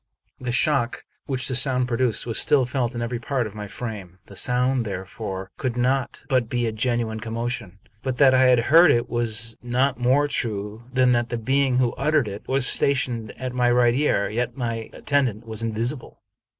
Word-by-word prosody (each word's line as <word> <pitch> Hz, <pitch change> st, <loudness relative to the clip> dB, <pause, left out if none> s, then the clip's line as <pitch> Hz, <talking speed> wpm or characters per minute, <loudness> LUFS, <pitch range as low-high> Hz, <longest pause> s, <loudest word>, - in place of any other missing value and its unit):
The 125 Hz, -1 st, -3 dB
shock 130 Hz, -1 st, +1 dB, 0.2 s
which 130 Hz, -2 st, -1 dB
the 130 Hz, -, -2 dB
sound 125 Hz, 0 st, +2 dB
produced 120 Hz, -2 st, 0 dB
was 115 Hz, -2 st, 0 dB
still 135 Hz, -3 st, +3 dB
felt 125 Hz, -1 st, -2 dB
in 120 Hz, -, -2 dB
every 120 Hz, 0 st, -3 dB
part 125 Hz, 0 st, -1 dB
of 105 Hz, -, -7 dB
my 105 Hz, -1 st, -6 dB
frame. 100 Hz, -5 st, -7 dB
The 100 Hz, -, -14 dB
sound, 125 Hz, +3 st, +1 dB
therefore, 95 Hz, -1 st, -6 dB
could 125 Hz, -3 st, -2 dB
not 130 Hz, +1 st, 0 dB
but 130 Hz, -5 st, +1 dB
be 120 Hz, -1 st, 0 dB
a 115 Hz, -, 0 dB
genuine 110 Hz, 0 st, -1 dB
commotion. 115 Hz, -3 st, -4 dB, 0.2 s
But 130 Hz, -1 st, -3 dB
that 135 Hz, -2 st, +6 dB
I 130 Hz, 0 st, +5 dB
had 125 Hz, -2 st, +5 dB
heard 165 Hz, +8 st, +6 dB
it 120 Hz, 0 st, +1 dB
was 115 Hz, -1 st, -1 dB
not 125 Hz, +3 st, 0 dB
more 130 Hz, +4 st, +3 dB
true 110 Hz, -4 st, -4 dB
than 130 Hz, -1 st, +3 dB
that 120 Hz, 0 st, +1 dB
the 120 Hz, -, -2 dB
being 130 Hz, +2 st, +1 dB
who 125 Hz, -2 st, +2 dB
uttered 150 Hz, -2 st, +2 dB
it 100 Hz, 0 st, -7 dB
was 135 Hz, -1 st, +1 dB
stationed 120 Hz, -6 st, 0 dB
at 130 Hz, 0 st, -4 dB
my 125 Hz, -1 st, +2 dB
right 120 Hz, -1 st, +4 dB
ear; 130 Hz, -7 st, +1 dB
yet 120 Hz, +6 st, -3 dB
my 115 Hz, -3 st, -3 dB
attendant 125 Hz, -6 st, -1 dB
was 110 Hz, 0 st, -4 dB
invisible. 115 Hz, +4 st, -3 dB
120 Hz, 190 wpm, -23 LUFS, 115-130 Hz, 0.2 s, that